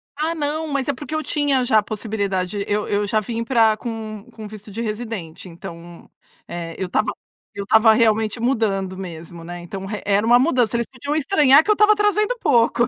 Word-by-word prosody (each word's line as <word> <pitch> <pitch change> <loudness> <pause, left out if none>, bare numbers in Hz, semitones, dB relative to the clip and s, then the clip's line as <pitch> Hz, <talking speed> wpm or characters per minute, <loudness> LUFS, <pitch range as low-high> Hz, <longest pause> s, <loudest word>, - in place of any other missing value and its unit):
Ah 315 +3 -1
não, 310 +1 -2
mas 280 -3 -2
é 285 - +1
porque 295 +4 -6
eu 310 - -1
tinha 285 -4 +1
já 220 -3 +4
a - - -3
possibilidade. 200 -3 -2
Eu 210 0 -1
eu 205 0 0
já 215 +2 +2
vim 230 +2 -4
pra 230 -3 +3
com 220 -3 -6
com 220 -2 -9
visto 215 0 -11
de 225 +4 -5
residente, 215 -7 -5
então, 170 0 -11 0.4
eh, 170 -1 -6
eu 190 - -2
estava 215 +4 0 0.4
eu 200 - -4
estava 220 +2 +5
realmente 220 0 +2
mudando 205 -6 0
mesmo, 170 -2 -8
né. 175 +1 -7
Então 190 +2 -7
e 210 - -4
era 205 +1 +2
uma 240 +1 +6
mudança, 250 -5 +2
eles 235 - -2
podiam 280 +3 -4
estranhar 295 -2 +5
que - - -8
eu - - +7
estava 425 0 +5
trazendo 420 +3 +1
pouco. 240 - +3
220 Hz, 200 wpm, -21 LUFS, 200-265 Hz, 0.4 s, eu